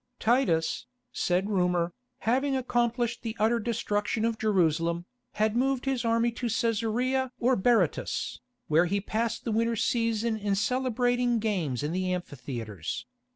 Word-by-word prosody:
Titus, 220 -9 +1 0.2
said 180 +2 0
rumour, 180 -4 +1 0.3
having 270 +4 +1
accomplished 240 -1 0
the 230 -1 -5
utter 225 +2 +3
destruction 220 -1 -1
of 230 -1 -1
Jerusalem, 170 -4 +1 0.3
had 215 +1 +1
moved 265 +1 +1
his 265 -3 0
army 230 +1 +2
to 240 +1 -3
Cæsarea 235 +3 0
or 250 +2 +3
Berytus, 215 -5 +1 0.3
where 165 +3 +4
he 200 +3 0
passed 225 +3 -2
the 230 - -1
winter 230 +1 +1
season 230 0 0
in 205 -1 0
celebrating 245 +1 +1
games 180 - -1
in 150 - -1
the 185 +1 -1
amphitheatres. 120 - -5
225 Hz, 135 wpm, -28 LUFS, 185-240 Hz, 0.3 s, where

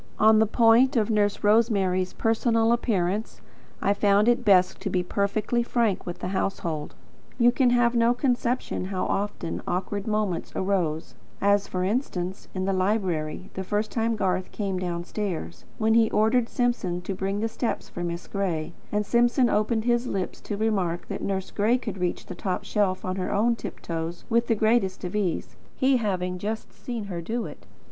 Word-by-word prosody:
On 215 0 +6
the 220 - +4
point 235 +4 +5
of 220 0 +2
Nurse 205 -1 +1
Rosemary's 200 -4 +2
personal 225 0 +2
appearance, 210 -3 0 0.4
I 200 - +3
found 205 +1 +3
it 240 +1 +3
best 185 -4 +4
to 200 - -3
be 180 -1 0
perfectly 205 +5 0
frank 235 -6 0
with 175 - -4
the 180 - -4
household. 170 -5 -2 0.4
You 240 -1 +5
can 250 0 +3
have 240 -1 +3
no 235 0 +3
conception 245 -5 -1
how 190 -1 -2
often 85 - -2
awkward 195 +3 -2
moments 210 -5 -1
arose; 175 -5 -1 0.3
as, 200 0 +3
for 180 -1 -2
instance, 190 -4 -2
in 185 0 -1
the 195 - +1
library, 185 -4 -1
the 190 - -4
first 210 +3 -1
time 230 0 0
Garth 185 -2 -1
came 195 -3 -2
downstairs; 175 - -4
when 220 0 +2
he 225 -1 +5
ordered 230 +2 +2
Simpson 240 -8 -1
to 195 - -3
bring 195 +2 -2
the 225 - 0
steps 225 +1 -3
for 175 - -6
Miss 170 0 -4
Gray, 180 -6 -2 0.2
and 210 0 0
Simpson 240 +2 +3
opened 220 +1 +1
his 240 0 +2
lips 190 -5 -3
to 205 - -4
remark 195 -6 0
that - - -4
Nurse 190 -1 -2
Gray 220 +4 +2
could 215 -6 -6
reach 180 -1 -1
to - - -24
the - - -4
top 185 +1 -3
shelf 195 -3 0
on 185 0 -2
her 185 -1 -2
own 225 +4 +2
tiptoes 165 -5 -5
with 235 +1 +3
the 225 - +2
greatest 215 -4 +1
ease, 185 -1 -2 0.2
he 265 0 +3
having 180 -5 -2
just 215 +3 -4
seen 235 -3 -5
her 180 -4 -5
do 230 +7 -3
it. - - -11
205 Hz, 180 wpm, -26 LUFS, 185-230 Hz, 0.4 s, On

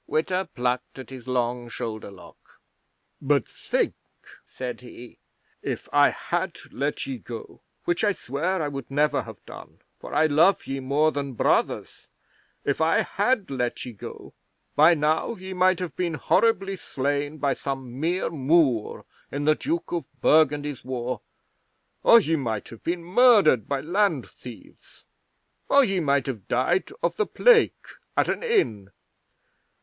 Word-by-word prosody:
'Witta 180 +4 -1
plucked 125 +1 -2
at 130 0 -9
his 130 -2 -10
long 120 -1 -1
shoulder 110 -3 -5
lock. 100 -2 -17 0.6
"But - - +1
think!" - - -1 0.5
said 125 -1 -7
he. 120 -1 -12 0.4
"If - - -4
I 145 0 +6
had 175 0 -3
let 140 +2 -2
ye 135 -3 -5
go 115 +1 -9 0.2
which 175 +3 0
I 210 - +4
swear 165 +5 -2
I - - -1
would 140 -1 -6
never 150 +2 +2
have - - -12
done, - - -12 0.2
for - - -10
I 160 - +4
love 160 +6 +4
ye 135 0 -3
more 145 +4 +2
than 140 -2 -4
brothers - - 0 0.6
if 140 +2 0
I 160 +1 +3
had 205 - 0
let 125 -3 -2
ye 125 - -7
go, 100 - -10 0.4
by 160 +4 +6
now 155 +8 0
ye 190 -1 -8
might 185 0 +3
have 180 -1 -5
been 170 -3 -1
horribly 195 - +1
slain 145 0 -2
by 140 -2 +1
some 135 -2 -5
mere 170 +4 0
Moor 140 -6 +1 0.3
in 145 +1 -3
the 155 - +5
Duke 320 - -3
of 170 -5 -2
Burgundy's 150 -3 +2
war, 125 -2 -4 0.8
or 235 - +8
ye 165 -6 0
might 115 -8 -3
have 115 - -12
been 170 0 -2
murdered 195 - +5
by 140 -1 -1
land 195 +7 +1
thieves, - - -14 0.6
or 280 0 +6
ye 195 -6 0
might 140 -4 +1
have 115 -8 -5
died 150 +10 +1
of - - 0
the 430 - +1
plague 485 -2 +3 0.3
at - - +3
an - - -1
inn. 115 - 0
145 Hz, 155 wpm, -25 LUFS, 130-180 Hz, 0.8 s, or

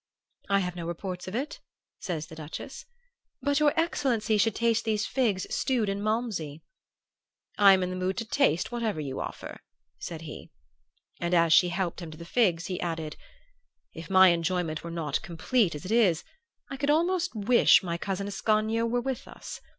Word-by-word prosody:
"'I 200 0 +3
have 180 -1 -3
no 170 -2 -5
reports 180 +2 -5
of 185 - -5
it,' 275 +5 -3 0.4
says 160 -4 -4
the - - -14
Duchess. 160 - -8 0.5
'But 285 0 +1
your 300 -1 +4
excellency 240 -10 +1
should 225 0 +2
taste 230 -1 +1
these 215 -1 0
figs 225 -8 0
stewed 240 -6 0
in 200 0 -2
malmsey 210 -9 -2 0.5
' - - -43
"'I 200 -1 +8
am 190 -1 +2
in 180 - -2
the - - -4
mood 185 +1 -2
to 230 - -2
taste 235 - +1
whatever 230 -8 -2
you 140 -3 -4
offer,' - - -7 0.4
said 165 -2 -6
he; 150 - -9 0.7
and 175 +1 0
as 165 -1 +4
she 180 - +6
helped 185 0 -2
him 170 - -7
to 155 - -10
the 170 - -9
figs 180 -4 +1
he 180 -2 -4
added, 160 -3 -3 0.8
'If 165 +3 -9
my 190 -1 +7
enjoyment 170 -2 -1
were 170 - -6
not 155 -3 -2
complete 185 +1 0
as 150 - -8
it 190 - -5
is, 200 -8 +3 0.4
I 270 - -6
could 285 +1 -1
almost 345 +1 +1
wish 220 +1 +5
my 170 -2 -3
cousin 195 +1 -3
Ascanio 215 +3 +1
were 245 +1 0
with 265 -1 -4
us. - - -9
195 Hz, 185 wpm, -28 LUFS, 170-230 Hz, 0.8 s, I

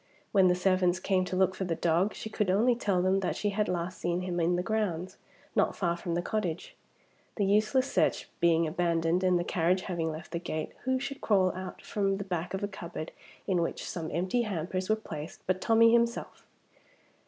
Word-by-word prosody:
When 190 -2 +5
the 180 - +4
servants 185 -1 +2
came 185 -1 +1
to 185 - -3
look 190 0 +3
for 190 - -4
the 175 -3 -1
dog, 170 +5 +1
she - - -6
could 210 -2 -1
only 220 +7 +4
tell 200 -6 0
them 190 +1 +3
that 190 - -1
she 205 - -1
had 210 +1 0
last 180 +1 -3
seen 175 +1 -1
him 180 -1 -2
in 170 +1 +2
the 180 - -1
grounds, 190 -5 -2 0.4
not - - +2
far 170 -3 0
from 170 0 -3
the 175 - -1
cottage. 180 -5 -3 0.6
The 205 - +1
useless 215 +6 +2
search - - +1
being 170 -1 +4
abandoned, 170 +1 +1
and 180 -1 +4
the 175 - 0
carriage 180 +2 +1
having 170 -4 -2
left 155 +1 -8
the 170 - -2
gate, 155 -3 -4
who 260 0 +1
should 275 +1 -5
crawl 190 -4 +3
out 185 0 -7
from 195 -2 0
the 200 - -4
back 180 -1 -3
of 190 - -4
a - - +1
cupboard 170 -5 -7 0.3
in 185 -3 +1
which 170 - -3
some 165 -2 -4
empty 185 +9 0
hampers 185 -2 -3
were 215 - +4
placed 160 -8 -8
but 185 0 0
Tommie 230 0 +5
himself! 235 0 0
185 Hz, 210 wpm, -29 LUFS, 170-205 Hz, 0.6 s, When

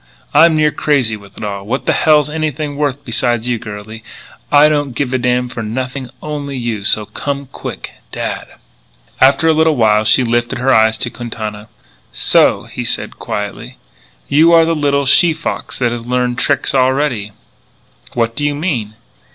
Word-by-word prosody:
I'm 160 +2 +6
near 155 -1 +3
crazy 130 -9 +1
with 100 -1 -15
it - - -8
all. 100 -1 -4
What 120 +7 -3
the - - +2
hell's 150 -2 +3
anything 150 -1 -3
worth 145 -1 -2
beside 120 -1 0
you 125 -2 -1
girlie. 105 +1 -9 0.5
I 145 +1 +7
don't 145 -4 -1
give 135 -1 -2
a 130 - +1
damn 125 0 +1
for 120 -1 -6
nothing 130 +3 -4
only 145 -2 -4
you, 115 -4 -3
so 105 0 +2
come 140 +5 -4
on - - -13
quick. - - -7 0.2
Dad." - - -4 0.7
After 135 +4 +5
a 160 - +5
little 160 0 +3
while 110 -3 +3
she 115 +4 +4
lifted 120 0 0
her 130 +2 +2
eyes 110 0 +4
to 120 - -2
Quintana. 110 -3 -6 0.4
"So," - - +3
he - - -6
said - - -2
quietly, 105 -1 -5 0.5
"you 155 +4 +4
are 165 -1 +6
the 165 - +1
little 140 -2 +1
she 160 +5 +5
fox 160 +1 -4
that 120 -2 0
has 120 0 -6
learned 125 -1 0
tricks 140 -1 +1
already." 130 -5 +1 0.8
"What 115 -1 -1
do 145 - -2
you 145 0 0
mean?" 125 - -3
130 Hz, 175 wpm, -16 LUFS, 115-145 Hz, 0.8 s, I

